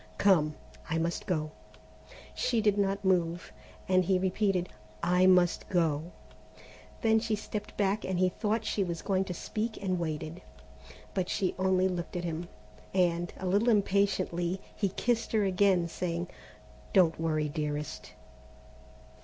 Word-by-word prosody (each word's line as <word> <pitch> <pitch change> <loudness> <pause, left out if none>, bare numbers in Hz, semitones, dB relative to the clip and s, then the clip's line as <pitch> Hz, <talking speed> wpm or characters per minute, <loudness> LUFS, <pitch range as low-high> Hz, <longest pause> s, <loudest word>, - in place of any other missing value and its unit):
Come, 155 -7 +4 0.3
I 165 - 0
must 165 +1 -2
go!" 155 -4 -1 0.8
She 235 - 0
did 210 -2 +3
not 200 0 0
move, 175 -2 +1 0.3
and 185 0 +4
he 185 +1 +2
repeated: 185 -1 +1 0.4
"I 180 +1 +4
must 180 -2 +3
go." 165 -2 +1 0.9
Then 220 -1 +4
she 220 -1 -1
stepped 210 0 -6
back 200 +1 +1
and 185 -1 -2
he 185 0 +3
thought 220 +4 -1
she 200 - 0
was 170 -2 -4
going 190 -1 +1
to 185 - -4
speak 220 +5 -3
and 185 -3 -1
waited, 160 +1 -4 0.7
but 185 -2 -1
she 190 -3 0
only 190 0 +3
looked 175 -2 -4
at 175 - -2
him, 170 0 -3 0.5
and, 175 -2 +2
a 190 - -6
little 200 +6 +3
impatiently, 195 -4 +1 0.2
he 200 - 0
kissed 230 +5 -1
her 215 -2 +3
again, 185 -2 +3
saying: 170 +1 -3 0.6
"Don't 170 -4 +4
worry, 155 -2 +1
dearest." 150 -1 -4
185 Hz, 145 wpm, -30 LUFS, 170-200 Hz, 0.9 s, Come